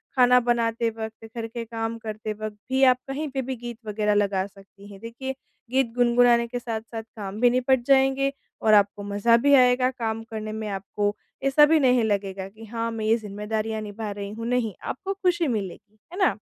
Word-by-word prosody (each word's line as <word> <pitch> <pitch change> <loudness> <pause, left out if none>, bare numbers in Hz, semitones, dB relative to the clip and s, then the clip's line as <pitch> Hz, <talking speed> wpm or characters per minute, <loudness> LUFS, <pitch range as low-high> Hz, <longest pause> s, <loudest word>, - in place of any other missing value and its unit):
खाना 250 -1 +6
बनाते 235 -1 +1
वक़्त 220 0 -7
घर 225 0 -3
के 235 +1 -6
काम 225 0 -4
करते 215 -1 -5
वक़्त 215 0 -6 0.2
भी 265 +1 +3
आप 250 - -16
कहीं 295 +3 -3
पे 265 0 -2
भी 260 +1 -4
गीत 240 -1 -7
वग़ैरह 210 0 +1
लगा 200 -2 +1
सकती 195 0 -17
हैं। 195 - -11
देखिए 250 +4 -5 0.4
गीत 260 -3 +1
गुनगुनाने 240 -1 +4
के 245 +1 -4
साथ-साथ 225 -1 -5
काम 205 -1 -6
भी 245 - +6
निपट 255 0 +2
जाएँगे 270 0 +4 0.3
और 215 -1 +4
आपको 205 0 +3
मज़ा 230 +3 +4
भी 285 - +6
आएगा 250 -1 +5
काम 225 -3 -3
करने 215 -1 -4
में 215 0 -4
आपको 205 +1 -2 0.3
ऐसा 275 +2 +6
भी 315 +1 +4
नहीं 250 -4 +4
लगेगा 195 -2 -1
कि 220 +2 -13
हाँ 230 +1 -3
मैं 225 -1 -4
ये 220 +1 +4
ज़िम्मेदारियाँ 215 +1 -3
निभा 210 0 -5
रही 200 0 -5
हूँ 230 +1 -6
नहीं, 240 -4 0
आपको 385 +9 -4
खुशी 360 -4 +1
मिलेगी। 210 -1 -4 0.2
है - - -7
ना? 380 - +3
225 Hz, 195 wpm, -25 LUFS, 210-250 Hz, 0.4 s, खाना